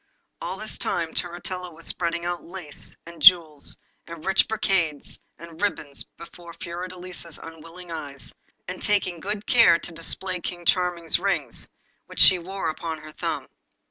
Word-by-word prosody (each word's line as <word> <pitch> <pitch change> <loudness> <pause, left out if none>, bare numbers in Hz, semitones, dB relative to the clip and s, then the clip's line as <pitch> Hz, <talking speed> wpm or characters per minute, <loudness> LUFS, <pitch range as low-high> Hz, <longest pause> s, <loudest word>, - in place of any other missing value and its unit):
All - - -3
this - - -2
time - - -1
Turritella 180 +1 -3
was 165 +1 -9
spreading 170 -1 -1
out 175 0 -2
lace, 175 -4 -4
and 170 0 -11
jewels, 160 -5 +6 0.3
and 165 -2 -8
rich 190 0 +4
brocades, 190 -9 0 0.2
and 165 +1 -11
ribbons 150 -9 -1
before 170 0 -11
Fiordelisa's 180 -1 -6
unwilling 165 +2 -10
eyes, 145 -4 -3 0.3
and - - -5
taking 195 -4 +2
good 205 +3 -3
care 230 -8 +7
to 175 - -6
display 180 +3 -1
King 175 0 -5
Charming's 175 -2 +2
ring, 195 +1 0 0.6
which - - -8
she 185 -2 +10
wore 190 +1 -4
upon 160 0 -3
her 155 - -9
thumb. - - -3
175 Hz, 145 wpm, -25 LUFS, 165-185 Hz, 0.6 s, she